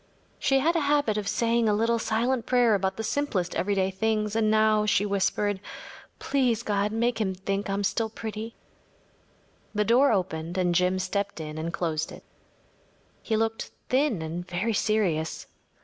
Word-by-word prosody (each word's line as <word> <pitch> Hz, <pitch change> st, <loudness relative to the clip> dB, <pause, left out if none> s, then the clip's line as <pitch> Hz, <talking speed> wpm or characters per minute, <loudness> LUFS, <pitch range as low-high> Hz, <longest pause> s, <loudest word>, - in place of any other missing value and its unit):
She 270 Hz, -, +3 dB
had 320 Hz, +6 st, +2 dB
a -, -, +3 dB
habit 285 Hz, -6 st, +2 dB
of 210 Hz, -1 st, -2 dB
saying 230 Hz, +2 st, +2 dB
a 210 Hz, -, +3 dB
little 230 Hz, +2 st, +1 dB
silent 235 Hz, +3 st, 0 dB
prayer 245 Hz, -3 st, +4 dB
about 190 Hz, -1 st, 0 dB
the 220 Hz, -, -3 dB
simplest 220 Hz, -8 st, -1 dB
everyday 195 Hz, -1 st, +1 dB
things, 215 Hz, +2 st, -1 dB
and 220 Hz, -1 st, +2 dB
now 215 Hz, -1 st, +3 dB
she 205 Hz, -1 st, +3 dB
whispered: 200 Hz, 0 st, 0 dB, 0.6 s
“Please 245 Hz, -5 st, 0 dB
God, 205 Hz, -1 st, 0 dB
make 230 Hz, +1 st, 0 dB
him 190 Hz, -3 st, -1 dB
think 195 Hz, +2 st, -3 dB
I -, -, 0 dB
am 200 Hz, +1 st, -1 dB
still 220 Hz, +3 st, 0 dB
pretty.‚ÄĚ 220 Hz, +1 st, -6 dB, 1.2 s
The 210 Hz, 0 st, +2 dB
door 255 Hz, +5 st, +5 dB
opened 175 Hz, -3 st, -2 dB
and 180 Hz, -1 st, +2 dB
Jim 180 Hz, +2 st, +2 dB
stepped 195 Hz, +1 st, -2 dB
in 155 Hz, 0 st, -6 dB
and 165 Hz, +1 st, -3 dB
closed 160 Hz, -2 st, -2 dB
it. -, -, -11 dB, 1.0 s
He 220 Hz, -, -1 dB
looked 225 Hz, 0 st, -1 dB, 0.2 s
thin 255 Hz, -, +1 dB
and 165 Hz, +2 st, -4 dB
very 185 Hz, +6 st, -1 dB
serious. 195 Hz, -8 st, 0 dB
210 Hz, 165 wpm, -27 LUFS, 190-230 Hz, 1.2 s, door